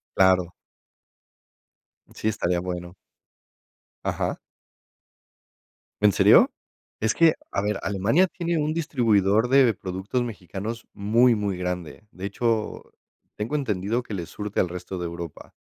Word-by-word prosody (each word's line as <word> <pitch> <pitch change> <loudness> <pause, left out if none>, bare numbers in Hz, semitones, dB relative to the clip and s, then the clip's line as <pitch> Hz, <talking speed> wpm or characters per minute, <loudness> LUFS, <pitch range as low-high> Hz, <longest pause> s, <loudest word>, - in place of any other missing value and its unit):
Claro. 90 -2 +4 1.6
Sí, - - -3
estaría 90 -5 0
bueno. 90 0 -5 1.1
Ajá. - - -1 1.6
¿En 105 0 +6
serio? - - +6 0.5
Es 110 0 +1
que, 165 -1 +5 0.2
a - - 0
ver, 105 0 -1
Alemania 105 - +2
tiene 170 -2 -2
un 155 0 0
distribuidor 115 - +2
de 130 -3 +5
productos 95 +5 -3
mexicanos 110 0 -6
muy 115 +4 +4
muy 100 -3 -2
grande, 90 +1 -5
de 95 - -7
hecho, 110 +2 -1 0.5
tengo 105 +8 -3
entendido 115 -3 -1
que 110 - -8
le 90 -4 -3
surte 105 +4 -4
al 90 - +2
resto 90 +1 -6
de 90 - -3
Europa. 85 -2 -7
105 Hz, 125 wpm, -25 LUFS, 90-120 Hz, 1.6 s, En